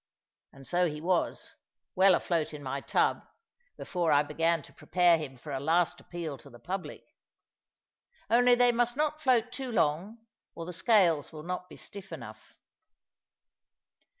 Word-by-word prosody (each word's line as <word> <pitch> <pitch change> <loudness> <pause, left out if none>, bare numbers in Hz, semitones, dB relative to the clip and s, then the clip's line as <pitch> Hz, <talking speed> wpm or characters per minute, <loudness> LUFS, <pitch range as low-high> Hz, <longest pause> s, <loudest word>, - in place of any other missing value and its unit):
And 135 0 -14
so 175 +6 +1
he 150 0 -6
was, 175 +2 -1 0.4
well 190 -1 +5
afloat 165 -4 -1
in 145 - -9
my 135 +1 -3
tub, - - +1 0.6
before 175 -3 -1
I 145 0 +5
began 165 +2 0
to - - -15
prepare 175 -2 +3
him 135 -4 -7
for 145 +4 -9
a 135 - -2
last 165 +4 +1
appeal 165 -6 -6
to 140 - -14
the 120 - -14
public. 185 +8 -6 1.2
Only 245 +1 +5
they 245 0 +4
must 240 +1 0
not 305 0 0
float 245 -4 +2
too 255 0 -5
long, 200 +5 -1 0.3
or 165 - -6
the 180 - -6
scales 175 - +3
will 155 -1 -9
not 180 +1 -5
be - - -12
stiff 195 -2 -10
enough. 110 -9 -10
175 Hz, 155 wpm, -29 LUFS, 150-215 Hz, 1.2 s, well